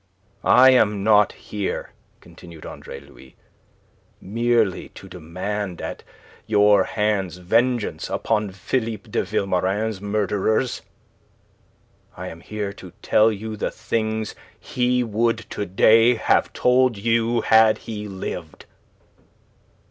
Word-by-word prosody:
"I 130 +1 +7
am 105 -5 +2
not 105 -1 +4
here," 105 -2 -5 0.3
continued 85 -3 -14
Andre - - -9
Louis, 65 - -17 0.8
"merely 115 -1 0
to 95 - -11
demand 90 +2 -5
at - - -6 0.5
your 105 -1 +4
hands 100 -5 -1
vengeance 115 +6 0
upon 105 -2 -1
Philippe 110 +2 -4
de - - +1
Vilmorin's 95 +2 -1
murderers. 105 +3 -1 1.4
I - - -6
am 80 - -11
here 105 +2 -5
to 90 -3 -13
tell 110 +1 +4
you 110 +1 -6
the 105 - -2
things 110 -1 -3 0.3
he 125 0 0
would 115 0 -1
to 100 - -4
day 115 +6 +5
have 110 - +1
told 125 -2 +2
you 115 +2 +1
had 110 0 +5
he 105 -2 -6
lived." 95 -2 -7
105 Hz, 110 wpm, -22 LUFS, 100-115 Hz, 1.4 s, I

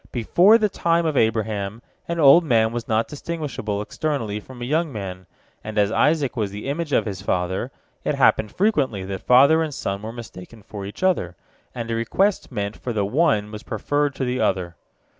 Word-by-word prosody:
Before 175 - +5
the 215 -2 +2
time 170 -3 +1
of 155 -2 0
Abraham 110 -2 0 0.2
an 170 0 -3
old 150 +3 +7
man 115 -7 +2
was 120 -1 -4
not 110 0 +1
distinguishable 145 -10 -4
externally 115 -6 -3
from 125 +4 -13
a 120 - -4
young 155 +4 0
man, 95 -4 -7 0.4
and 110 0 -6
as 105 0 +3
Isaac 150 +2 +2
was 105 -4 -1
the 105 +5 -7
image 150 +2 -3
of - - +2
his 95 -3 -5
father, 95 -1 -1 0.3
it - - 0
happened 105 - +3
frequently 145 - 0
that 95 0 -5
father 140 +6 +5
and 160 -2 -2
son 100 -7 -4
were 110 +1 -6
mistaken 115 -2 -11
for 100 -2 -7
each 105 - -9
other, 130 - +1 0.4
and 115 -1 -4
a - - 0
request 185 - 0
meant 100 -2 -3
for 120 - -4
the 105 -2 0
one 105 -4 +1
was 105 -1 -7
preferred 145 +2 -1
to 130 - -2
the 125 +1 -1
other. 85 -2 0
115 Hz, 195 wpm, -22 LUFS, 105-150 Hz, 0.4 s, old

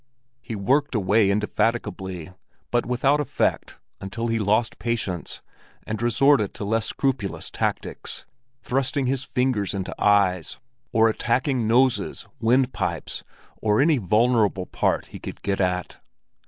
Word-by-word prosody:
He 115 -2 -6
worked 135 +8 +1
away 105 0 +3
indefatigably 100 -4 -1 0.4
but 120 -1 +1
without 135 +4 +2
effect 145 - -1 0.2
until 115 +4 -4
he 115 0 +1
lost 110 +2 +1
patience 105 -7 -3 0.4
and 110 0 -4
resorted 120 -2 +3
to 100 - -4
less 110 +1 0
scrupulous 130 -8 -2
tactics—thrusting 130 +1 -3
his 130 +1 0
fingers 125 -7 0
into 95 -1 -3
eyes, 100 -4 +3 0.3
or 115 -1 +5
attacking 120 +2 0
noses, 125 +3 +2
windpipes, 125 +4 0 0.4
and 105 -1 +2
any 150 0 +4
vulnerable 105 -1 +2
part - - 0
he - - -7
could - - -8
get 100 0 0
at. 90 -1 -1
115 Hz, 120 wpm, -24 LUFS, 100-125 Hz, 0.4 s, or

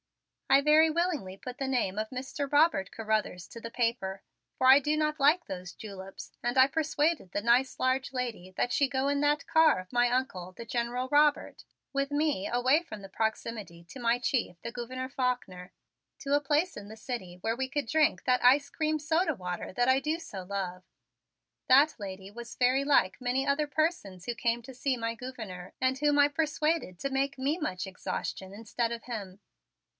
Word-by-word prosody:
I 275 - +6
very 305 +2 +5
willingly 310 - -1
put 250 +4 -8
the 270 - -1
name 235 -7 0
of 215 0 -2
Mr. 270 +2 -5
Robert 290 - +3
Carruthers 215 -6 -2
to 230 - -10
the 230 - -6
paper, 230 -6 -1 0.4
for 255 - +2
I 265 +2 +9
do 300 +2 0
not 305 0 0
like 305 +5 +4
those 180 -1 -7
juleps, 195 -2 -9
and 240 +2 -1
I 260 0 +8
persuaded 305 - 0
the 205 - -2
nice 245 +3 +2
large 260 +1 +1
lady 240 -8 -4
that 245 - 0
she 280 -2 +2
go 270 0 0
in 285 0 +1
that 295 0 +2
car 320 - +5
of 185 +4 -11
my 245 0 +3
Uncle, 240 -8 -2
the 230 - -9
General 240 +2 -2
Robert, 295 0 +2 0.3
with 275 +1 -1
me 290 -9 0
away 255 +6 +3
from 215 -12 -9
the 195 - -9
proximity 220 -4 -3
to 255 - -11
my 235 0 +2
chief, 240 -8 -1
the 235 - -6
Gouverneur 255 +1 -5
Faulkner, 245 -9 -3 0.5
to 280 0 -2
a 290 - +4
place 300 +5 +1
in 205 0 -9
the 220 - -10
city 215 -7 -6
where 225 +5 -1
we 260 +1 -3
could 290 0 -2
drink 305 +6 +2
that 250 -1 +2
ice 275 +3 +5
cream 310 -1 0
soda 320 +1 +1
water 180 -3 -5
that 245 +6 +1
I 260 +1 +5
do 310 +3 -1
so 200 - -8
love. 185 -1 -4 0.9
That 280 +4 +6
lady 195 -2 -7
was 235 +3 -9
very 255 +2 +3
like 275 -8 +2
many 255 +2 0
other 295 +2 +1
persons 290 - -1
who 240 - -2
came 235 +1 0
to 265 +3 -10
see 255 +1 -1
my 230 0 -2
Gouverneur 220 -8 -8
and 260 0 +1
whom 295 0 +3
I 285 - +7
persuaded 300 - -1
to 275 - -2
make 275 +1 0
me 280 +5 0
much 185 - -3
exhaustion 190 0 -5
instead 230 +3 -3
of 235 -1 -5
him. 200 -6 -6
250 Hz, 195 wpm, -29 LUFS, 215-285 Hz, 0.9 s, I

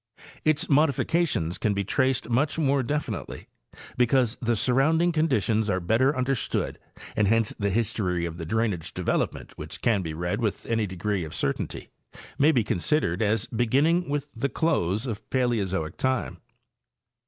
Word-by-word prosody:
Its 155 -1 +2
modifications 145 - +1
can 105 -2 +1
be 100 - 0
traced 130 +5 0
much 135 +7 +1
more 140 -3 +2
definitely 130 - -4 0.5
because 125 -1 +3
the 120 -1 +1
surrounding 155 +9 +2
conditions 115 - +1
are 95 - +1
better 120 - +2
understood, 130 -3 -1 0.4
and 105 - +2
hence 115 +1 +2
the 100 -1 +1
history 100 -5 0
of 85 0 -6
the - - -4
drainage 105 -4 -1
development - - -2
which - - -7
can 110 -4 +3
be 80 -3 -5
read 90 +6 -2
with 110 -4 -2
any 115 -2 0
degree 95 +1 -2
of 80 +1 -6
certainty 70 - -3 0.5
may 150 +3 +6
be 125 -7 +2
consid 115 - +1
ered 85 +2 -1
as 110 +1 +1
beginning 140 +10 +1
with 145 0 -3
the 135 +5 -1
close 110 - 0
of 115 -5 -6
Paleozoic 100 -10 0
time. 130 - -1
115 Hz, 155 wpm, -26 LUFS, 100-135 Hz, 0.5 s, may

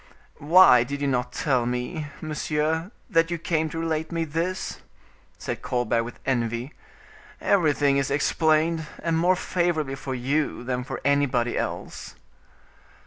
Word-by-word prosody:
"Why 150 -5 +7
did 140 +3 -5
you 140 - -1
not 125 -2 0
tell 125 -3 0
me, 125 +6 -3
monsieur, 155 +2 -1 0.2
that 165 0 +2
you 170 - -2
came 160 -1 -1
to 165 - -6
relate 160 -1 -2
me 165 -1 -1
this?" 170 +5 -3 0.6
said - - -5
Colbert 120 -2 0
with 120 +1 -8
envy; 120 +1 -1 0.7
"everything 145 -7 +2
is 140 -1 0
explained, 155 +2 +1 0.2
and 165 -1 +1
more 175 +3 +3
favorably 170 -6 -1
for 135 -1 -5
you 135 +1 -1
than 125 0 -2
for 135 +1 -6
anybody 135 -4 +2
else." - - -5
150 Hz, 140 wpm, -25 LUFS, 125-165 Hz, 0.7 s, Why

